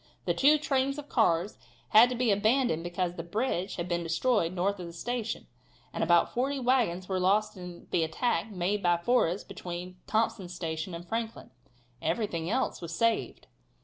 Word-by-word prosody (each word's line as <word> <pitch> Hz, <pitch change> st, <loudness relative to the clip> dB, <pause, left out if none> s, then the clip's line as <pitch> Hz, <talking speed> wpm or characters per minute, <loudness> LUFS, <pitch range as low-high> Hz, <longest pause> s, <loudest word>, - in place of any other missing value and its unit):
The 175 Hz, -, +2 dB
two 285 Hz, -, +5 dB
trains 275 Hz, -2 st, 0 dB
of 295 Hz, 0 st, -8 dB
cars 185 Hz, -4 st, +1 dB, 0.3 s
had 230 Hz, +3 st, +7 dB
to 250 Hz, -, -2 dB
be 245 Hz, -2 st, +2 dB
abandoned 215 Hz, -4 st, +2 dB
because 175 Hz, 0 st, -2 dB
a -, -, 0 dB
bridge 190 Hz, +1 st, -2 dB
had 170 Hz, 0 st, -4 dB
been 175 Hz, -1 st, -1 dB
destroyed 170 Hz, +2 st, +1 dB
north 190 Hz, +2 st, -1 dB
of 175 Hz, -, -6 dB
the 170 Hz, -, -9 dB
station, 230 Hz, +5 st, -3 dB, 0.5 s
and -, -, -1 dB
about 170 Hz, +1 st, +3 dB
forty 270 Hz, +3 st, 0 dB
wagons 240 Hz, -8 st, +1 dB
were 190 Hz, -1 st, -1 dB
lost 205 Hz, +4 st, +2 dB
in 180 Hz, -2 st, -9 dB
the 165 Hz, -, +2 dB
attacks 170 Hz, +4 st, -1 dB
made 200 Hz, +1 st, -1 dB
by 175 Hz, -2 st, +3 dB
Forrest 185 Hz, -1 st, +1 dB
between 180 Hz, +1 st, -7 dB
Thompson's 205 Hz, -5 st, -1 dB
Station 165 Hz, 0 st, -4 dB
and 170 Hz, +1 st, -9 dB
Franklin. 225 Hz, +1 st, -4 dB, 0.5 s
Everything 170 Hz, -1 st, -1 dB
else 260 Hz, +5 st, -1 dB
was 170 Hz, -1 st, -5 dB
saved. 230 Hz, +2 st, 0 dB
185 Hz, 175 wpm, -29 LUFS, 175-235 Hz, 0.5 s, had